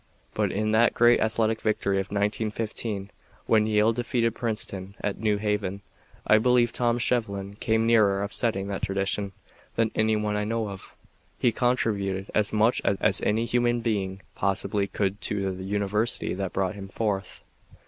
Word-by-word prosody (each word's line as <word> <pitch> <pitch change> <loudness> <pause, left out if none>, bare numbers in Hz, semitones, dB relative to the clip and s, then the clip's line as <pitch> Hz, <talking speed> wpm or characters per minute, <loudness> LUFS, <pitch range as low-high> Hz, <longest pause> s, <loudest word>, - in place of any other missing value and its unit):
But - - 0
in 110 +2 0
that 115 +2 +4
great 120 0 +5
athletic 110 0 +1
victory 100 -2 0
of 95 0 -1
1915, 105 0 -2 0.3
when 110 -1 +3
Yale 110 +1 +3
defeated 115 -1 0
Princeton 100 -5 -3
at 100 - -2
New 105 -1 +1
Haven, 105 -2 -2 0.4
I 110 - +5
believe 120 0 +3
Tom 120 -1 +1
Shevlin 100 -5 -1
came 110 0 +1
nearer 105 -4 +4
upsetting 100 -1 -1
that 95 - -3
tradition 100 +1 -1 0.4
than 115 -1 +1
any 110 0 +2
one 105 -1 -1
I 105 - 0
know 110 0 -1
of. 95 -1 -10 0.4
He 120 - +2
contributed 100 -6 0
as 105 -1 +1
much 110 +3 +2
as 100 -1 +2
any 110 +3 +1
human 120 0 +1
being 100 -4 -2
possibly 100 +1 0
could 100 +1 -2
to 100 -2 -1
the 95 0 -6
university 105 +3 -1
that 95 -1 -3
brought 95 -1 -1
him 100 -1 -8
forth. 100 -2 -3
105 Hz, 160 wpm, -26 LUFS, 100-115 Hz, 0.4 s, great